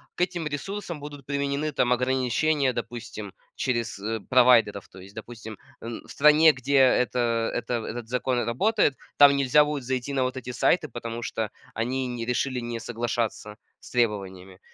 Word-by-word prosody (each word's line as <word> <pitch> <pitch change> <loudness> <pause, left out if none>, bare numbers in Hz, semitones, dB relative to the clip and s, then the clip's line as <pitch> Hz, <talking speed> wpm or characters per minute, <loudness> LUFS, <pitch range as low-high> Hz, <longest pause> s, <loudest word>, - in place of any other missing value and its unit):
к - - -5
этим 180 -2 -1
ресурсам 170 +3 -5
будут 145 -2 -9
применены 140 +2 -1
там 125 -3 +2
ограничения- 130 +3 +1
допустим, 115 -5 -6 0.2
через, 120 -4 -2
э, 110 +2 -3
провайдеров. 120 -6 +4
То 95 - -14
есть, 100 +2 -14
допустим, 110 -1 -9 0.2
м, 115 0 -6
в - - -12
стране, 150 +2 +6
где 140 +1 -1
это 120 -3 +2
это 125 - -2
этот 115 0 -6
закон 125 -1 0
работает, 140 - +1 0.2
там 140 -1 +8
нельзя 140 +2 +4
будет 150 -2 -3
зайти 130 +1 -3
на 135 -1 +1
вот 130 +1 -2
эти 125 0 -6
сайты, 155 +5 +1
потому 115 0 -6
что 110 -2 -3 0.3
они 130 +3 -1
не 120 -2 -4
решили 125 +1 -1
не 120 -1 -4
соглашаться 115 -2 -3 0.2
с - - -14
требованиями. 95 -5 -2
125 Hz, 165 wpm, -26 LUFS, 115-140 Hz, 0.3 s, там